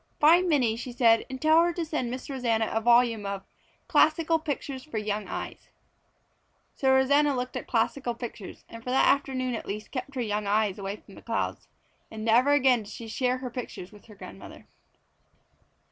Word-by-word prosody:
"Find 345 +4 +5
Minnie," 245 -8 +2
she 250 +1 -6
said, 230 -2 +3
"and 260 0 -6
tell 315 +2 +5
her 345 - +1
to 335 0 -3
send 305 -6 -2
Miss 255 +2 -6
Rosanna 235 -5 0
a 225 - 0
volume 235 -2 +4
of 200 -1 -4 0.4
Classical 320 +1 +3
Pictures 280 -3 -4
for 305 -7 -6
Young 210 0 -2
Eyes." - - -7 1.0
So 265 -1 +1
Rosanna 280 +2 +4
looked 250 0 -4
at - - -5
Classical 240 +1 0
Pictures, 230 -4 -8
and 230 0 -11
for 250 - -6
that 260 - +3
afternoon 260 -2 +1
at 225 - -5
least 210 +2 -6
kept 275 +1 -5
her 255 - -1
young 210 -2 -2
eyes 210 -1 +1
away 195 +1 -4
from 205 -1 -17
the - - -13
clouds. 230 -1 -3 0.4
And 220 0 -7
never 240 +5 +4
again 260 -4 +4
did 210 0 -11
she 230 +2 -8
share 250 +3 0
her 255 -1 -6
pictures 230 -7 -7
with 210 -2 -16
her 215 - -14
grandmother. 200 - -11
245 Hz, 190 wpm, -27 LUFS, 220-275 Hz, 1.0 s, Find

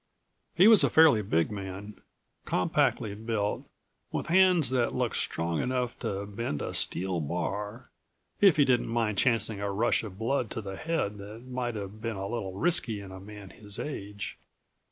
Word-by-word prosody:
He 180 +5 +7
was 220 -3 +7
a - - +4
fairly 155 -9 +6
big 85 -4 0
man, 100 +1 -7 0.4
compactly 100 - +1
built, 105 -1 -3 0.4
with - - -2
hands 180 -6 +5
that 125 -3 +1
looked - - -1
strong 85 0 -1
enough 125 -1 -2
to 100 0 -3
bend 100 -7 -4
a - - -4
steel 95 -1 0
bar, 100 - -4 0.5
if 195 -6 +6
he 145 - +5
didn't 125 -2 +2
mind 115 -3 0
chancing 115 -4 +2
a 100 0 -1
rush 115 +5 +1
of 100 -4 -8
blood 120 +1 -1
to - - -4
the 95 -1 -6
head 150 -11 -2
that 105 +4 -10
might 125 -2 -3
have 105 +1 -7
been 115 -1 -3
a 95 0 -4
little 100 -5 -4
risky 165 - 0
in 100 -1 -9
a 95 - -9
man 100 -1 -11
his 105 +3 -5
age. 105 -7 -6
105 Hz, 175 wpm, -29 LUFS, 100-125 Hz, 0.5 s, He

